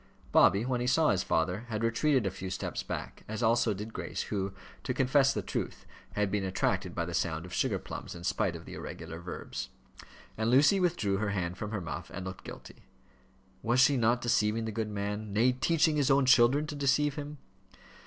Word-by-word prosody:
Bobby, 100 +4 +5
when 125 -1 -1
he 125 - -1
saw 155 +4 +4
his 95 -2 +1
father, 90 +8 0
had 110 0 -2
retreated 125 +2 +2
a 95 - 0
few 95 0 -6
steps 95 - -3
back, - - -6
as 110 +2 -4
also 115 0 +3
did 105 +3 -5
Grace, - - -4
who, 100 -1 -1 0.3
to - - -2
confess 135 +1 +4
the - - -3
truth, - - -4 0.3
had 105 -1 0
been 105 -2 0
attracted 95 -1 -1
by 85 - -1
the 85 - -6
sound 80 -1 -1
of 90 - -10
sugar - - +1
plums, - - -7
in 85 - -9
spite - - 0
of - - -9
the - - -9
irregular 80 0 -7
verbs. 90 +1 -6 0.7
And 110 +1 +1
Lucy 145 - +5
withdrew 165 - +1
her 105 0 -1
hand 90 -3 -2
from 105 - -4
her 105 -3 -3
muff, 80 -3 -6
and 95 0 -6
looked 95 0 -7
guilty. - - -11 0.7
Was 120 +2 +2
she 130 +3 +6
not 120 0 +2
deceiving 115 -2 +1
the 110 - -3
good 110 0 -2
man 105 0 -4
nay, 115 +5 +4
teaching 155 +4 +2
his 140 -2 +2
own 135 0 +4
children 130 +3 +5
to 155 -1 -6
deceive 145 +1 +2
him? 150 +1 -6
110 Hz, 205 wpm, -30 LUFS, 95-130 Hz, 0.7 s, she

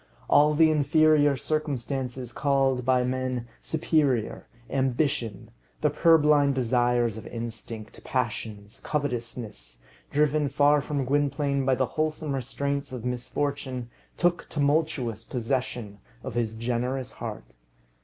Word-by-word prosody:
All 150 +1 +5
the 160 0 +5
inferior 150 -1 +4
circumstances 130 -3 -3
called 135 -2 +1
by 125 0 +3
men 130 -1 -2
superior, 150 -7 0 0.2
ambition, 130 -4 -1 0.3
the 150 - +3
purblind 150 -3 +4
desires 120 -2 +2
of 110 - -8
instinct, 115 -2 -7
passions, 110 -4 -3
covetousness, 115 - -4 0.3
driven 150 0 +2
far 145 +1 +4
from 140 -2 -2
Gwynplaine 140 0 +1
by 130 -1 +3
the 130 - +1
wholesome 155 0 -2
restraints 140 +2 -2
of 125 -2 -6
misfortune, 125 0 -3 0.3
took 175 -1 +1
tumultuous 145 -7 0
possession 120 -4 -3 0.2
of - - -5
his 115 -2 -1
generous 125 +3 -2
heart. - - -7
130 Hz, 110 wpm, -27 LUFS, 120-145 Hz, 0.3 s, All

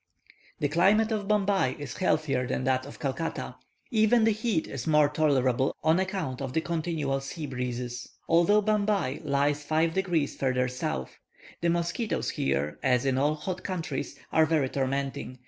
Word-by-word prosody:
The 145 - 0
climate 195 +9 +3
of 210 -2 -2
Bombay 200 -9 +2
is 145 -4 -7
healthier 135 -8 +1
than - - -2
that 130 0 0
of 145 - -10
Calcutta; 150 +4 -3 0.3
even 220 0 +4
the 225 - +4
heat 215 -5 0
is 135 +1 -6
more 150 -2 +5
tolerable 135 -4 +1
on 160 +3 +4
account 185 -9 -2
of 135 -2 -4
the 160 - +1
continual 160 -5 -1
sea 150 +3 -6
breezes, 125 -2 -4 0.2
although 175 +6 +4
Bombay 205 -9 +1
lies 145 0 +1
five 160 +2 +1
degrees 175 -6 0
further 130 -1 +1
south. 125 - -4 0.4
The 170 - +2
mosquitoes 175 +6 -1
here, 70 +2 -1
as 125 +1 +2
in 130 -1 +1
all 145 +2 +2
hot 185 +4 -5
countries, 165 -8 -4
are 160 0 +4
very 155 -5 +1
tormenting. 135 -1 -2
150 Hz, 160 wpm, -28 LUFS, 130-185 Hz, 0.4 s, more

